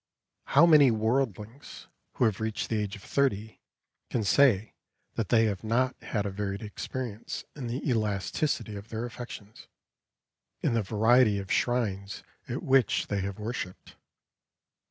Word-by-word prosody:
How 145 Hz, +5 st, +6 dB
many 150 Hz, -5 st, +7 dB
worldlings 115 Hz, +1 st, -2 dB, 0.3 s
who -, -, 0 dB
have 110 Hz, -4 st, +1 dB
reached 110 Hz, -1 st, -2 dB
the 110 Hz, -2 st, 0 dB
age 105 Hz, -1 st, -3 dB
of 100 Hz, -, -13 dB
thirty 110 Hz, -6 st, 0 dB, 0.5 s
can 115 Hz, -, -1 dB
say 110 Hz, -2 st, +4 dB, 0.4 s
that 110 Hz, -4 st, -2 dB
they 115 Hz, -1 st, +5 dB
have 100 Hz, -3 st, -2 dB
not 125 Hz, +4 st, +1 dB
had 105 Hz, -3 st, -2 dB
a 100 Hz, -, -2 dB
varied 100 Hz, 0 st, -4 dB
experience 110 Hz, +1 st, -5 dB
in 135 Hz, -5 st, -5 dB
the 125 Hz, +6 st, -3 dB
elasticity 110 Hz, +1 st, -1 dB
of 100 Hz, +2 st, -9 dB
their 115 Hz, +1 st, -3 dB
affections, 120 Hz, -3 st, -9 dB, 0.9 s
in -, -, 0 dB
the 115 Hz, -, +2 dB
variety 110 Hz, +2 st, +4 dB
of 100 Hz, -1 st, -5 dB
shrines 100 Hz, -6 st, -1 dB, 0.3 s
at -, -, -3 dB
which 135 Hz, -2 st, +2 dB
they 100 Hz, -1 st, 0 dB
have 100 Hz, 0 st, -4 dB
worshipped? 105 Hz, -4 st, -6 dB
110 Hz, 145 wpm, -28 LUFS, 100-125 Hz, 0.9 s, many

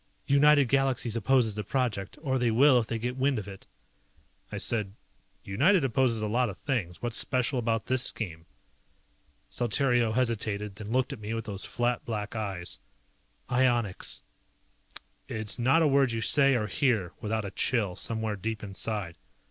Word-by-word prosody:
"United 145 Hz, 0 st, +5 dB
Galaxies 130 Hz, -3 st, +1 dB
opposes 115 Hz, 0 st, +2 dB
the 105 Hz, +1 st, -4 dB
project. 110 Hz, -5 st, -2 dB
Or 130 Hz, -3 st, 0 dB
they 120 Hz, -1 st, +2 dB
will 125 Hz, +3 st, +5 dB
if 115 Hz, -, -3 dB
they 115 Hz, -, -2 dB
get 125 Hz, +3 st, -3 dB
wind 135 Hz, 0 st, +1 dB
of 105 Hz, -2 st, -5 dB
it." 100 Hz, -1 st, -10 dB, 0.8 s
I -, -, -4 dB
said, 105 Hz, -4 st, -1 dB, 0.5 s
"United 165 Hz, -, +3 dB
opposes 120 Hz, -3 st, +1 dB
a -, -, 0 dB
lot 120 Hz, +2 st, +1 dB
of 95 Hz, -, -8 dB
things, 110 Hz, -11 st, -3 dB
what's 120 Hz, -1 st, -2 dB
special 125 Hz, +1 st, 0 dB
about 115 Hz, -1 st, -1 dB
this 130 Hz, -1 st, 0 dB
scheme?" 85 Hz, -10 st, -2 dB, 1.0 s
Saltario 120 Hz, -1 st, +1 dB
hesitated, 105 Hz, -4 st, -1 dB
then 105 Hz, 0 st, -7 dB
looked 130 Hz, +2 st, +1 dB
at 130 Hz, -, -9 dB
me 105 Hz, +2 st, -4 dB
with 115 Hz, 0 st, -4 dB
those 100 Hz, -3 st, -6 dB
flat 120 Hz, 0 st, -1 dB
black 110 Hz, +1 st, -4 dB
eyes. 95 Hz, -5 st, -4 dB, 0.7 s
"Ionics." 120 Hz, -6 st, 0 dB, 1.0 s
It's 110 Hz, +1 st, 0 dB
not 135 Hz, +7 st, +4 dB
a -, -, +4 dB
word 135 Hz, -3 st, +3 dB
you 115 Hz, -, -2 dB
say, 135 Hz, +3 st, +4 dB
or 110 Hz, -3 st, 0 dB
hear, 105 Hz, -, 0 dB
without 110 Hz, 0 st, -2 dB
a 100 Hz, -, -5 dB
chill 105 Hz, -6 st, 0 dB
somewhere 110 Hz, 0 st, -2 dB
deep 110 Hz, +3 st, -4 dB
inside. 100 Hz, -3 st, -3 dB
115 Hz, 165 wpm, -28 LUFS, 105-130 Hz, 1.0 s, United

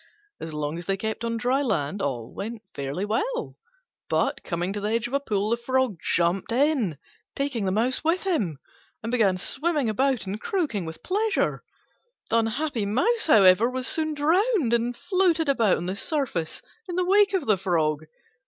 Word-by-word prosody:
As 160 Hz, -, -6 dB
long 150 Hz, +2 st, -3 dB
as 175 Hz, -, -9 dB
they 195 Hz, 0 st, 0 dB
kept 220 Hz, +3 st, -4 dB
on 230 Hz, 0 st, -1 dB
dry 250 Hz, +4 st, +1 dB
land 195 Hz, -, -1 dB
all 125 Hz, -7 st, -3 dB
went 225 Hz, +1 st, -6 dB
fairly 140 Hz, +8 st, -3 dB
well; 465 Hz, -, -2 dB, 0.5 s
but, -, -, 0 dB
coming 175 Hz, +2 st, -2 dB
to 205 Hz, -, -4 dB
the 210 Hz, -, -1 dB
edge 230 Hz, +1 st, 0 dB
of 245 Hz, -, -5 dB
a 280 Hz, -, +3 dB
pool, 210 Hz, -5 st, -1 dB
the 235 Hz, -, +2 dB
Frog 255 Hz, -5 st, 0 dB, 0.2 s
jumped 175 Hz, +4 st, +1 dB
in, 250 Hz, -, +1 dB, 0.4 s
taking 275 Hz, -7 st, -1 dB
the 190 Hz, -, +1 dB
Mouse 235 Hz, +8 st, 0 dB
with 330 Hz, +3 st, +1 dB
him, 220 Hz, -, 0 dB, 0.5 s
and 230 Hz, -, -3 dB
began 210 Hz, -7 st, +3 dB
swimming 290 Hz, -, 0 dB
about 260 Hz, +2 st, +1 dB
and 200 Hz, +3 st, -5 dB
croaking 285 Hz, -, -1 dB
with 160 Hz, 0 st, -8 dB
pleasure. 420 Hz, +3 st, 0 dB, 0.7 s
The 230 Hz, -, +4 dB
unhappy 230 Hz, 0 st, -1 dB
Mouse, 425 Hz, -, +2 dB
however, 205 Hz, -3 st, +6 dB
was 255 Hz, 0 st, -3 dB
soon 310 Hz, +2 st, 0 dB
drowned, 330 Hz, -, +2 dB
and 235 Hz, +1 st, 0 dB
floated 360 Hz, -4 st, +1 dB
about 230 Hz, -8 st, +3 dB
on 175 Hz, -, -5 dB
the 185 Hz, +2 st, -2 dB
surface 215 Hz, -, -2 dB, 0.3 s
in 350 Hz, -, -3 dB
the 365 Hz, 0 st, +1 dB
wake 400 Hz, +1 st, +4 dB
of 355 Hz, -7 st, -1 dB
the 215 Hz, -, +4 dB
Frog. 155 Hz, -5 st, 0 dB
230 Hz, 180 wpm, -25 LUFS, 195-295 Hz, 0.7 s, however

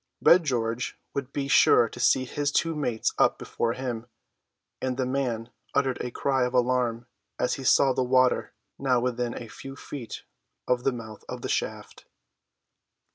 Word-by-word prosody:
Red 170 Hz, -1 st, +6 dB
George 120 Hz, -2 st, -1 dB
would 140 Hz, -1 st, -4 dB
be 140 Hz, -1 st, -2 dB
sure 120 Hz, -3 st, +6 dB
to 120 Hz, -, -11 dB
see 130 Hz, +1 st, +3 dB
his 145 Hz, +3 st, -1 dB
two 165 Hz, +2 st, +1 dB
mates 125 Hz, -7 st, -1 dB
up -, -, +4 dB
before 115 Hz, 0 st, -2 dB
him, 120 Hz, -3 st, -4 dB, 0.7 s
and 130 Hz, -1 st, -1 dB
the 130 Hz, -, 0 dB
man 125 Hz, -3 st, -2 dB, 0.2 s
uttered 135 Hz, -2 st, +1 dB
a 125 Hz, -, -3 dB
cry 130 Hz, +2 st, 0 dB
of 125 Hz, +1 st, -1 dB
alarm 120 Hz, -2 st, +1 dB, 0.3 s
as 125 Hz, -, 0 dB
he 135 Hz, -, -5 dB
saw 135 Hz, +1 st, +5 dB
the 130 Hz, -, 0 dB
water, 130 Hz, 0 st, +3 dB, 0.3 s
now 130 Hz, -2 st, +2 dB
within 120 Hz, -1 st, -1 dB
a 115 Hz, -, -8 dB
few 135 Hz, +6 st, -9 dB
feet 135 Hz, -4 st, -8 dB, 0.4 s
of 125 Hz, -1 st, +1 dB
the 135 Hz, -, +4 dB
mouth 110 Hz, -4 st, -8 dB
of -, -, -6 dB
the -, -, -3 dB
shaft. -, -, -3 dB
125 Hz, 170 wpm, -27 LUFS, 120-135 Hz, 0.7 s, Red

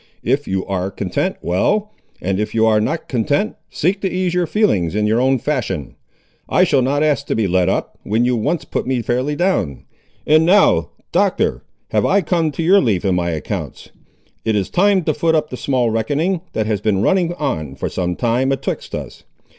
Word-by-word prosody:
If 135 Hz, +4 st, 0 dB
you 95 Hz, 0 st, -1 dB
ar' 95 Hz, -1 st, -2 dB
content, 100 Hz, -2 st, -2 dB
well; 205 Hz, -, +1 dB, 0.3 s
if 95 Hz, +4 st, -2 dB
you 110 Hz, 0 st, +4 dB
ar' 110 Hz, -1 st, +3 dB
not 155 Hz, +9 st, -2 dB
content, 145 Hz, -, 0 dB
seek 190 Hz, +5 st, -1 dB
to 190 Hz, -, 0 dB
ease 185 Hz, -1 st, -1 dB
your 180 Hz, -1 st, +1 dB
feelings 105 Hz, -, +1 dB
in 105 Hz, 0 st, +1 dB
your 110 Hz, +3 st, +2 dB
own 130 Hz, +1 st, +3 dB
fashion. 110 Hz, -, -3 dB, 0.6 s
I 180 Hz, -, +4 dB
shall 145 Hz, -7 st, +3 dB
not 140 Hz, +4 st, +1 dB
ask 145 Hz, -2 st, +1 dB
to -, -, 0 dB
be 110 Hz, -3 st, +1 dB
let 90 Hz, 0 st, +2 dB
up, -, -, -2 dB
when 110 Hz, +4 st, 0 dB
you 125 Hz, 0 st, +2 dB
once 140 Hz, +9 st, -1 dB
put -, -, -3 dB
me 130 Hz, -2 st, 0 dB
fairly 130 Hz, +6 st, -1 dB
down. 145 Hz, -, 0 dB, 0.4 s
And 155 Hz, +1 st, +5 dB
now, 190 Hz, +5 st, +4 dB, 0.2 s
Doctor, -, -, +1 dB, 0.3 s
have -, -, +2 dB
I 200 Hz, -, +3 dB
come 165 Hz, -2 st, 0 dB
to 165 Hz, -, -3 dB
your 195 Hz, +4 st, +5 dB
leaf 100 Hz, -7 st, 0 dB
in 95 Hz, -, +2 dB
my 90 Hz, -1 st, 0 dB
accounts. 80 Hz, -3 st, -5 dB, 0.5 s
It 110 Hz, -, 0 dB
is 100 Hz, -3 st, -1 dB
time 195 Hz, 0 st, +3 dB
to 155 Hz, -, +1 dB
foot 160 Hz, +2 st, +1 dB
up 155 Hz, -1 st, 0 dB
the -, -, -4 dB
small 125 Hz, -3 st, 0 dB
reckoning, 145 Hz, -, 0 dB
that 110 Hz, -, -1 dB
has 105 Hz, -2 st, -1 dB
been 105 Hz, -2 st, +1 dB
running 175 Hz, -3 st, +2 dB
on, 80 Hz, -, -3 dB
for -, -, -3 dB
some 90 Hz, -1 st, -2 dB
time, 125 Hz, +5 st, +1 dB
atwixt 135 Hz, 0 st, -3 dB
us. -, -, -8 dB
130 Hz, 200 wpm, -19 LUFS, 105-165 Hz, 0.6 s, And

